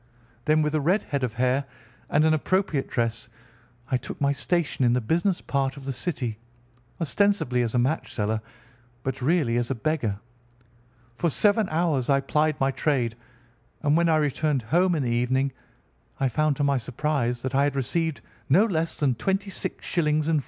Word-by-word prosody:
Then 155 0 +3
with 150 0 -1
a 155 - +1
red 180 +9 +2
head 140 -2 -3
of 120 -3 -1
hair, 130 +3 +1 0.4
and 150 +2 +3
an 160 - +4
appropriate 160 -2 0
dress, 115 -1 -1 0.6
I 130 - +3
took 125 - -8
my 140 -1 +2
station 150 0 0
in 120 -1 +4
the 125 - +2
business 170 - 0
part 135 0 -1
of 135 - -10
the 135 - -2
city, 125 -5 -3 0.6
ostensibly 170 -7 +1
as 120 0 -1
a - - +3
match 130 +6 0
seller 110 0 -1 0.6
but 130 0 -3
really 135 -4 +2
as 120 0 -1
a 135 - 0
beggar. 115 -5 -1 1.0
For 170 - +2
seven 205 +5 +2
hours 155 -6 0
I 140 0 +4
plied 150 +2 0
my 135 0 +2
trade, 130 -3 0 0.7
and 145 0 +3
when 170 0 +3
I 160 - +4
returned 150 -2 +1
home 175 +8 +2
in 150 - 0
the 120 - -1
evening 130 +3 +1 0.7
I 135 - +2
found 155 +4 +1
to 145 - -1
my 140 -1 +2
surprise 125 -1 -1
that 130 0 -3
I 135 +1 +3
had 145 -1 -1
received 160 +4 -1 0.3
no 185 +11 +6
less 165 -5 -1
than 140 -4 +1
26_s_. 195 - -2
4_d_. 155 -1 +1
140 Hz, 180 wpm, -25 LUFS, 125-160 Hz, 1.0 s, no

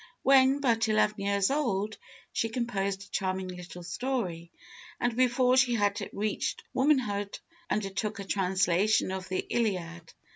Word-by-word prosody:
When 270 +1 +5
but 230 -4 +2
eleven 215 -1 +2
years 200 +2 +2
old, 215 -8 -1 0.3
she 225 - 0
composed 200 -5 -2
a 200 - -17
charming 185 -1 -2
little 180 0 -9
story, 180 -4 -3 0.5
and 240 -1 0
before 255 0 +3
she 255 -2 +4
had 205 -2 +1
reached 210 0 -2
womanhood, 240 -8 +1 0.3
undertook 210 +1 -2
a 200 - -5
translation 190 +1 +2
of 190 -1 -5
the 185 - -2
Iliad. 175 -7 -2
205 Hz, 135 wpm, -29 LUFS, 190-240 Hz, 0.5 s, When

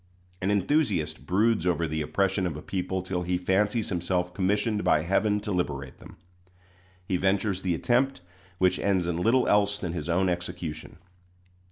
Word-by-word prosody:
An 95 - 0
enthusiast 100 - 0
broods 105 -1 +2
over 85 -2 +1
the 80 +1 -2
oppression 95 +4 0
of 80 -4 -4
a - - -7
people 95 0 -3
till 95 -1 -2
he 90 0 0
fancies 105 +5 +1
himself 90 0 -1
commissioned 105 +3 0
by 75 - +3
Heaven 105 +4 +1
to 105 - -4
liberate 70 -8 -3
them. - - -14 0.9
He 90 - 0
ventures 95 +1 0
the 90 -2 0
attempt, 125 +5 +1 0.4
which 90 0 +2
ends 95 -3 +1
in 85 -1 -1
little 115 +8 +3
else 105 0 +3
than 90 -5 -4
his 85 -1 -4
own 90 +3 +2
execution. 85 -3 -4
95 Hz, 165 wpm, -27 LUFS, 85-105 Hz, 0.9 s, by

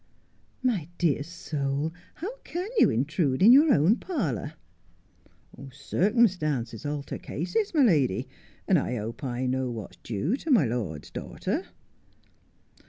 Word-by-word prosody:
' - - -38
My 170 -8 -4
dear 155 -5 +2
soul, 150 -2 -3 0.2
how 400 +10 -5
can 360 -4 -5
you - - +6
intrude 140 +4 0
in 225 - +9
your 290 +4 +7
own 170 - +4
parlour? 185 - -3 0.4
' - - -37 0.2
' 135 +1 -13
Circumstances 150 - 0
alter 145 -1 -4
cases, 180 +7 -2
my 295 - +5
lady, 145 - +2 0.4
and - - +4
I 125 - -2
hope 115 +4 -5
I 125 -1 -2
know 130 0 0
what's 110 -6 -7
due 120 - -2
to 325 - -7
my 225 - +5
lord's 110 -11 -4
daughter.' - - -3
145 Hz, 140 wpm, -27 LUFS, 125-205 Hz, 0.4 s, in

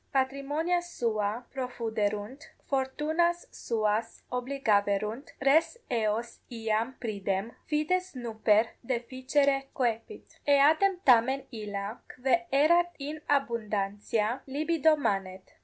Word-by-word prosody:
Patrimonia 275 +6 0
sua 230 -9 -2
profuderunt, 225 -1 -3 0.2
fortunas 310 +6 0
suas 220 0 -1
obligaverunt, 225 -3 0
res 300 - +3
eos 230 0 -1
iam 225 +1 -1
pridem, 200 -1 -2 0.2
fides 340 +3 0
nuper 220 -2 +2 0.2
deficere 260 +3 0
coepit: 240 - -3
eadem 310 +7 +5
tamen 260 +2 +5
illa, 210 -1 -5 0.2
quae 245 -2 +1
erat 340 +6 +4
in 295 +2 -6
abundantia, 215 -2 0
libido 310 +3 +2
manet. 195 -8 -2
250 Hz, 90 wpm, -29 LUFS, 215-285 Hz, 0.2 s, eadem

